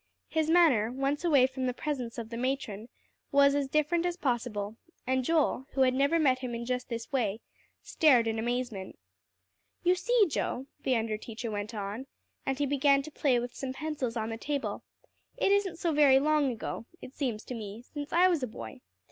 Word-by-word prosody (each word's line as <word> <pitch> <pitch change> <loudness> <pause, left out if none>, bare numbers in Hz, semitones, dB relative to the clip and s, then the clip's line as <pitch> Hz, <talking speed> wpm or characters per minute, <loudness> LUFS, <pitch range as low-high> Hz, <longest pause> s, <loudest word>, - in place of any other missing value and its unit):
His 315 -1 0
manner, 295 -11 +4
once 275 +4 -1
away 290 -7 +5
from 260 0 -2
the 250 - -2
presence 255 -6 -4
of 230 -1 -6
the - - -4
matron, 240 -4 -3 0.4
was 280 -1 +5
as 285 -1 0
different 305 +4 +1
as 350 0 -1
possible; 230 - -2 0.3
and 260 0 +1
Joel, 290 -3 +1
who 270 - +1
had 255 -1 +5
never 280 +5 +3
met 265 -5 +3
him 250 -2 -4
in 235 0 -5
just 250 0 -2
this 230 -1 -5
way, 225 -6 0 0.4
stared 260 -7 +4
in 225 0 -1
amazement. 240 -4 -3 0.9
"You 360 +1 +5
see, 455 +4 +3
Joe," 265 -4 -2 0.2
the 260 - +1
under 225 -2 -1
teacher 225 +1 -6
went 210 +2 -4
on, 210 +6 -5 0.4
and 270 -1 0
he 290 - +1
began 280 0 +3
to 310 - -9
play 275 -4 +2
with 245 0 -5
some 265 -1 -5
pencils 270 -5 -3
on 220 0 -2
the 225 - -4
table, 285 +3 -3 0.6
"it - - +2
isn't 400 -4 +2
so 340 0 0
very 285 -3 +6
long 295 -1 +2
ago, 230 0 -5
it 255 - -10
seems 240 -8 -2
to - - -7
me, 220 0 -7
since 290 +3 -7
I 355 +2 +5
was 345 -5 +1
a 255 - -1
boy. 115 - -9
260 Hz, 200 wpm, -30 LUFS, 230-295 Hz, 0.9 s, very